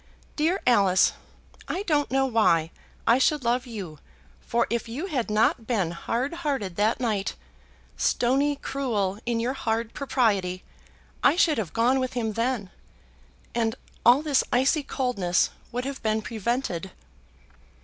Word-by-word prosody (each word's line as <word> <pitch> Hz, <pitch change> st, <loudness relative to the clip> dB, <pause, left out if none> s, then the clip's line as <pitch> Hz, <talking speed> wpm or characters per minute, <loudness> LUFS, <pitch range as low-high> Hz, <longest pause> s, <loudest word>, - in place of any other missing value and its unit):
dear 330 Hz, +6 st, +1 dB
Alice! 195 Hz, -6 st, +4 dB, 0.5 s
I 380 Hz, -, -2 dB
don't 295 Hz, -6 st, +1 dB
know 270 Hz, +1 st, +2 dB
why 170 Hz, -10 st, +2 dB, 0.3 s
I 235 Hz, +3 st, +5 dB
should 295 Hz, +1 st, +2 dB
love 245 Hz, +2 st, 0 dB
you, 190 Hz, -10 st, -7 dB, 0.4 s
for 235 Hz, 0 st, 0 dB
if 235 Hz, 0 st, -2 dB
you 275 Hz, +10 st, -4 dB
had 265 Hz, -, -2 dB
not 220 Hz, +2 st, +2 dB
been 195 Hz, -9 st, 0 dB
hardhearted 260 Hz, -, -2 dB
that 215 Hz, +5 st, +1 dB
night, 215 Hz, -6 st, -1 dB, 0.6 s
stony 275 Hz, +4 st, +2 dB
cruel 220 Hz, -9 st, -2 dB
in 235 Hz, -1 st, +1 dB
your 240 Hz, +3 st, -1 dB
hard 230 Hz, -3 st, -2 dB
propriety, 205 Hz, -10 st, 0 dB, 0.6 s
I -, -, +5 dB
should 325 Hz, -, +3 dB
have 185 Hz, -8 st, -3 dB
gone 245 Hz, +4 st, +3 dB
with 255 Hz, -1 st, -2 dB
him 225 Hz, -3 st, -2 dB
then, 230 Hz, -4 st, -1 dB, 0.8 s
and 225 Hz, -1 st, 0 dB, 0.3 s
all 250 Hz, +5 st, +6 dB
this 290 Hz, -4 st, +2 dB
icy 265 Hz, +5 st, +3 dB
coldness 240 Hz, -11 st, 0 dB, 0.2 s
would 245 Hz, +1 st, -3 dB
have 275 Hz, 0 st, -5 dB
been 220 Hz, 0 st, 0 dB
prevented." 220 Hz, -5 st, -2 dB
235 Hz, 140 wpm, -26 LUFS, 210-270 Hz, 0.8 s, all